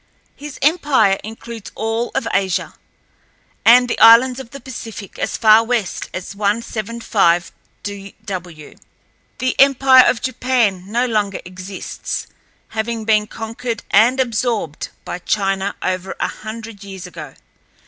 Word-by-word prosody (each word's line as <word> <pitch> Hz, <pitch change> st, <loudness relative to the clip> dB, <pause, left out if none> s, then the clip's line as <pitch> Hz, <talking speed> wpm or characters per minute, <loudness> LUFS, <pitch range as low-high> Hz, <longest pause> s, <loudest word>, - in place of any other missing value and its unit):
His 295 Hz, 0 st, -9 dB
empire 280 Hz, -, +3 dB
includes 225 Hz, 0 st, -9 dB
all 225 Hz, +2 st, -1 dB
of 230 Hz, -, -1 dB
Asia, 190 Hz, -2 st, 0 dB, 0.9 s
and 245 Hz, +2 st, +7 dB
the -, -, -2 dB
islands 245 Hz, +3 st, +7 dB
of 260 Hz, -3 st, -9 dB
the 275 Hz, -, -9 dB
Pacific 225 Hz, -6 st, -9 dB
as -, -, -2 dB
far 225 Hz, +1 st, +5 dB
east 215 Hz, -6 st, -3 dB
as 185 Hz, +2 st, -6 dB
175°W. 200 Hz, -4 st, -3 dB, 0.6 s
The 255 Hz, 0 st, -2 dB
empire 265 Hz, -1 st, +7 dB
of 235 Hz, -, +2 dB
Japan 235 Hz, -7 st, 0 dB
no 240 Hz, +3 st, +2 dB
longer 210 Hz, -5 st, -1 dB
exists, 185 Hz, +1 st, -6 dB, 0.4 s
having 225 Hz, 0 st, -3 dB
been 215 Hz, -1 st, +3 dB
conquered 225 Hz, +1 st, -5 dB
and 235 Hz, +6 st, +5 dB
absorbed 230 Hz, -, -1 dB, 0.2 s
by -, -, -5 dB
China 195 Hz, +1 st, -1 dB
over 185 Hz, +1 st, -2 dB
a -, -, +1 dB
hundred 220 Hz, -1 st, -8 dB
years 195 Hz, -2 st, -8 dB
ago. 180 Hz, -, -9 dB
220 Hz, 120 wpm, -19 LUFS, 195-240 Hz, 0.9 s, and